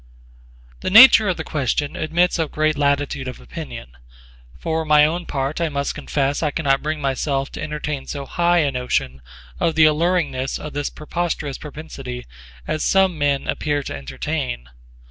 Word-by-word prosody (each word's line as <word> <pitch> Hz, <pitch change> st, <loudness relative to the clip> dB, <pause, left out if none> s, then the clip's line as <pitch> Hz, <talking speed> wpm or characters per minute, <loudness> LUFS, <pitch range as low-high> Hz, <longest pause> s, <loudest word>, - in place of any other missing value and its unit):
The -, -, -2 dB
nature 220 Hz, 0 st, +9 dB
of 180 Hz, -, 0 dB
the -, -, -4 dB
question 145 Hz, 0 st, -1 dB
admits 170 Hz, +3 st, +1 dB
of 160 Hz, -2 st, 0 dB
great 155 Hz, 0 st, +1 dB
latitude 140 Hz, -1 st, 0 dB
of 125 Hz, -, -7 dB
opinion: -, -, -8 dB, 0.7 s
for 160 Hz, -, -2 dB
my 150 Hz, -1 st, +5 dB
own 170 Hz, +3 st, -2 dB
part 140 Hz, +4 st, -2 dB
I 165 Hz, -, +1 dB
must 140 Hz, -1 st, -2 dB
confess 140 Hz, 0 st, -1 dB
I 155 Hz, -, +1 dB
can 160 Hz, -, -4 dB
not 135 Hz, -1 st, +2 dB
bring 155 Hz, 0 st, -2 dB
myself 135 Hz, 0 st, -1 dB
to -, -, -7 dB
entertain 150 Hz, -2 st, -4 dB
so 140 Hz, -1 st, -5 dB
high 175 Hz, +2 st, +2 dB
a 140 Hz, -, 0 dB
notion 125 Hz, -, -2 dB, 0.4 s
of 165 Hz, -, +1 dB
the 160 Hz, -1 st, +6 dB
alluringness 150 Hz, -4 st, +1 dB
of 150 Hz, -, -8 dB
this 145 Hz, 0 st, -2 dB
preposterous 155 Hz, -3 st, -3 dB
propensity 135 Hz, -5 st, -8 dB, 0.4 s
as 155 Hz, -, -2 dB
some 190 Hz, -2 st, +3 dB
men 145 Hz, -1 st, +1 dB
appear 145 Hz, -1 st, -1 dB
to -, -, -5 dB
entertain. 65 Hz, -2 st, -4 dB
145 Hz, 165 wpm, -21 LUFS, 135-160 Hz, 0.7 s, nature